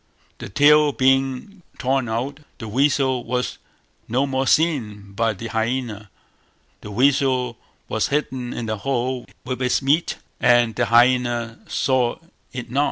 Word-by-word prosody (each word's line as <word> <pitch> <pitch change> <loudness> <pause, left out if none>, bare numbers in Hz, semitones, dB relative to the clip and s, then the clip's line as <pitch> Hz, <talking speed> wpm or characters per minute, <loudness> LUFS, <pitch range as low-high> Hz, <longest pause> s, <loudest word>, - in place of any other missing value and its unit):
The - - -7
tail 150 +6 +5
being 135 +9 0 0.2
torn 130 -2 0
out, 130 +6 -3 0.2
the 110 - -7
weasel 130 +1 +1
was 125 0 -3 0.5
no 130 +5 +1
more 135 -1 -1
seen 110 -12 +1
by 115 +1 0
the 115 +3 -7
hyaena: 110 -2 -2 0.7
the 105 - -9
weasel 130 +1 +2 0.3
was - - 0
hidden 130 -4 -2
in 120 - -4
the 110 -1 -2
hole 125 +2 -2 0.2
with 130 0 -4
its 125 -1 +2
meat, 150 +5 +1 0.2
and 120 -2 +4
the 120 - +1
hyaena 120 0 +2
saw 130 -3 +1 0.4
it 120 -2 -7
not. 135 - 0
125 Hz, 140 wpm, -22 LUFS, 115-135 Hz, 0.7 s, tail